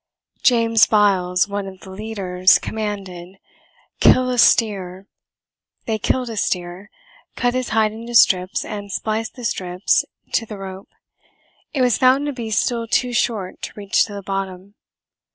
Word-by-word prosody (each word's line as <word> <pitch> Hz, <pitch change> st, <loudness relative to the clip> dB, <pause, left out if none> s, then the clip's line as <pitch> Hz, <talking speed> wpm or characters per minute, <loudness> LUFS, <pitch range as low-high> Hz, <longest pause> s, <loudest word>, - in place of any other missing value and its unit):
James 230 Hz, -2 st, +4 dB
Biles, 190 Hz, -3 st, +2 dB
one 200 Hz, -1 st, -4 dB
of 190 Hz, -1 st, -11 dB
the 190 Hz, -, -11 dB
leaders, 190 Hz, -3 st, +2 dB
commanded, 195 Hz, -4 st, -6 dB, 0.6 s
"Kill 255 Hz, 0 st, +5 dB
a 250 Hz, -, -1 dB
steer." 195 Hz, -5 st, +2 dB, 0.8 s
They 220 Hz, -1 st, -2 dB
killed 255 Hz, +4 st, 0 dB
a 220 Hz, -, -7 dB
steer, 180 Hz, +1 st, -3 dB, 0.5 s
cut 245 Hz, 0 st, 0 dB
his 255 Hz, -1 st, -2 dB
hide 220 Hz, -1 st, +2 dB
into 230 Hz, +2 st, -7 dB
strips, 185 Hz, -3 st, +4 dB
and 205 Hz, -2 st, -7 dB
spliced 220 Hz, +3 st, -3 dB
the 245 Hz, -2 st, -8 dB
strips 180 Hz, -3 st, 0 dB, 0.3 s
to 225 Hz, -, 0 dB
the 210 Hz, -, -8 dB
rope. 190 Hz, 0 st, -9 dB, 0.8 s
It 270 Hz, -4 st, 0 dB
was 245 Hz, -2 st, +2 dB
found 260 Hz, +2 st, +4 dB
to 290 Hz, -, -2 dB
be 235 Hz, -3 st, -6 dB
still 230 Hz, +2 st, 0 dB
too 245 Hz, +2 st, 0 dB
short 215 Hz, -6 st, -2 dB
to -, -, -6 dB
reach 205 Hz, +1 st, +1 dB
to 210 Hz, -, -10 dB
the 200 Hz, -, -7 dB
bottom. 195 Hz, 0 st, -5 dB
210 Hz, 150 wpm, -20 LUFS, 190-230 Hz, 0.8 s, Kill